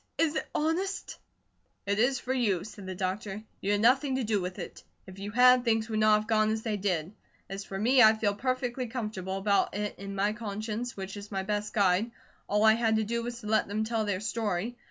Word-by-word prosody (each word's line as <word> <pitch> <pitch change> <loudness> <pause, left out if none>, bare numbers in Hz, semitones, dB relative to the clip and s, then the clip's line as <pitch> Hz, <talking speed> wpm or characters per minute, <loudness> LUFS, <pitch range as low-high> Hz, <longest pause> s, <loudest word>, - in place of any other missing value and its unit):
Is 325 -2 +2
it - - -2
honest?" 360 +6 -1 0.7
"It 200 +1 0
is 250 +3 +3
for 260 - -2
you," 210 -9 +1
said 205 -2 -10
the 185 - -5
doctor. 195 +3 -3 0.2
"You 200 +2 +1
had 205 - +1
nothing 265 +3 +3
to 260 - -1
do 210 -3 0
with 180 0 -5
it. - - -8 0.2
If 190 0 -12
you 200 +1 -5
had, 250 +3 +6
things 225 -1 +1
would 215 -1 -1
not 215 0 +5
have 215 - -10
gone 215 -1 +3
as 220 0 -1
they 220 -2 -1
did. 185 -3 -1 0.3
As 195 +1 -6
for 195 - -6
me, 250 +6 +4
I 220 -1 +8
feel 210 -2 +1
perfectly 255 +2 -2
comfortable 210 -6 -4
about 200 0 +1
it 210 0 -3
in 200 0 -6
my 205 +2 +1
conscience, 215 +2 -4
which 195 +1 -6
is 205 +1 -9
my 195 -1 -2
best 210 +1 -2
guide. 200 +2 +2 0.4
All 210 +1 +2
I 220 0 +7
had 225 -1 +2
to 220 - +2
do 235 +2 -2
was 240 0 -6
to - - -11
let 215 +1 +2
them 210 +2 -1
tell 225 0 -1
their 200 -2 -1
story. 215 0 -2
215 Hz, 230 wpm, -29 LUFS, 200-235 Hz, 0.7 s, I